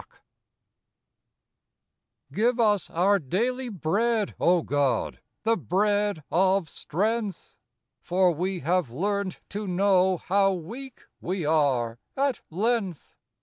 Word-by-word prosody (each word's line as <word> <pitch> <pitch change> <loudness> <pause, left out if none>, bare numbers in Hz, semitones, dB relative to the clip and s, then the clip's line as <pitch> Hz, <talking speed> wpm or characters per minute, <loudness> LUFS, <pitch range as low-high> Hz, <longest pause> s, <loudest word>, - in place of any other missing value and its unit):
C* 215 - 0
IVE 245 +1 +2
us 210 -4 +2
our 195 +4 +3
daily 240 - -1
Bread, 210 +4 0
O 175 -1 +3
God, 140 -5 0 0.2
the 230 +1 +3
bread 205 - 0
of 190 0 +3
strength! 210 +6 -3 0.5
For 180 0 +2
we 180 +2 -2
have 175 -2 +1
learnt 195 - -2
to 205 +1 -4
know 185 0 +3
How 195 +2 +2
weak 235 +10 -8 0.2
we 180 -2 -3
are 135 -7 +1 0.2
at 275 -1 0
length. 200 -2 -2
190 Hz, 105 wpm, -26 LUFS, 170-210 Hz, 0.5 s, our